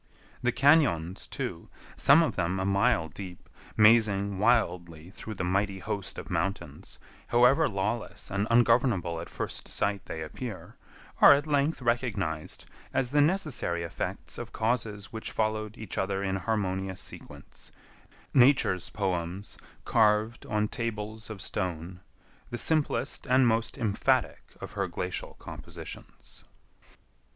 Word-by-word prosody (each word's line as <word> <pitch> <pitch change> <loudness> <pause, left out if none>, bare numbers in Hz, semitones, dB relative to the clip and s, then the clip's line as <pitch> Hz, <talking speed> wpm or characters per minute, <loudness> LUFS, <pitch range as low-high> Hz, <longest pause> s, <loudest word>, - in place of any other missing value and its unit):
The 125 -1 +2
cañons, 125 - +3
too, - - -5 0.3
some 150 +4 +6
of 160 - -1
them 90 +1 -1
a 95 - -1
mile 100 -2 +2
deep, 90 +2 -10 0.3
mazing 105 -3 +4
wildly 90 -7 +1
through 110 +1 -8
the 90 - -3
mighty 95 +2 0
host 95 +1 -4
of - - -7
mountains, 95 -7 -3 0.3
however 125 +6 +4
lawless 105 +3 -3
and 100 +2 0
ungovernable 115 -8 +3
at - - -8
first - - -5
sight 100 -1 0
they 80 - -5
appear, 105 +6 -7 0.5
are - - +10
at 145 +1 +1
length 145 -1 0
recognized 105 -10 -2 0.3
as 130 -2 0
the 145 0 +4
necessary 145 - 0
effects 85 - -4
of - - -7
causes 110 -2 -2
which 110 - -5
followed 110 0 -2
each 110 - -5
other 95 0 -1
in 95 -1 -1
harmonious 95 -3 -2
sequence—Nature's 125 -8 -1
poems 95 -1 -3 0.3
carved 110 +1 +2
on 105 0 0
tables 110 -1 -5
of 105 -4 -6
stone—the 90 +5 -6
simplest 140 -5 +1
and 130 0 +5
most 115 0 0
emphatic 105 -3 +1 0.2
of - - -8
her - - -2
glacial - - -4
compositions. - - -10
105 Hz, 125 wpm, -28 LUFS, 95-120 Hz, 0.5 s, are